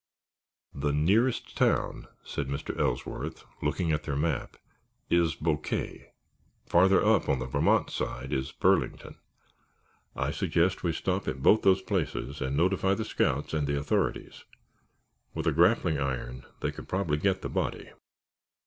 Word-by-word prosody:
"The 70 +1 -1
nearest 100 - +1
town," - - +1 0.2
said 70 - -4
Mr. 70 +1 -4
Ellsworth, - - -2 0.2
looking 85 -3 0
at 75 -1 0
their 75 -2 -3
map, 75 -1 -2 0.5
"is 85 -2 +3
Boquet. 75 -2 -3 0.5
Farther 95 +3 +4
up, - - +3
on 70 - +3
the 65 - -4
Vermont 65 - +2
side, 65 +2 -4
is 65 0 -2
Burlington. - - 0 1.0
I - - -1
suggest 90 +3 +1
that - - -17
we 85 - +2
stop - - -2
at 65 0 -3
both 110 - +6
those 95 -1 +4
places 80 - -2
and 65 +1 -1
notify 95 +3 +2
the 110 - -3
scouts 70 +4 0
and 75 -2 0
the 70 0 0
authorities. 70 +1 -1 0.9
With 80 -1 -3
a 80 - +3
grappling 85 -1 +3
iron 65 -2 -3 0.2
they - - 0
could - - -11
probably 90 -6 0
get 95 +3 0
the - - -3
body." - - -3
80 Hz, 150 wpm, -28 LUFS, 70-95 Hz, 1.0 s, both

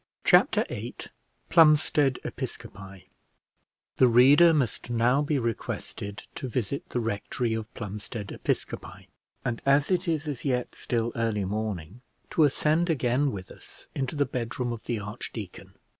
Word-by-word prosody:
Chapter - - +5
VIII - - -6 0.5
PLUMSTEAD 150 -4 +4
EPISCOPI 95 -2 -7 0.9
The 130 - +6
reader 135 +8 +7
must 135 -7 -1
now 120 +4 +3
be 150 0 0
requested 110 -3 -4
to 130 - -5
visit 125 +3 -3
the 125 - -1
rectory 115 +1 -2
of 110 0 -4
Plumstead 105 0 -6
Episcopi; - - -3 0.4
and 120 -2 -2
as 140 +4 +3
it 180 0 +1
is 160 -2 -1
as 145 -5 -4
yet 125 -3 -1
still 120 -1 -2
early 115 -4 0
morning, 105 0 -4 0.3
to 160 - +5
ascend 155 +4 +2
again 135 -2 +1
with 95 -4 -7
us - - -13
into 135 +1 -3
the 145 -1 +2
bedroom 120 -1 -3
of 115 - -9
the 120 - -1
archdeacon. 105 -1 -7
120 Hz, 140 wpm, -27 LUFS, 110-145 Hz, 0.9 s, reader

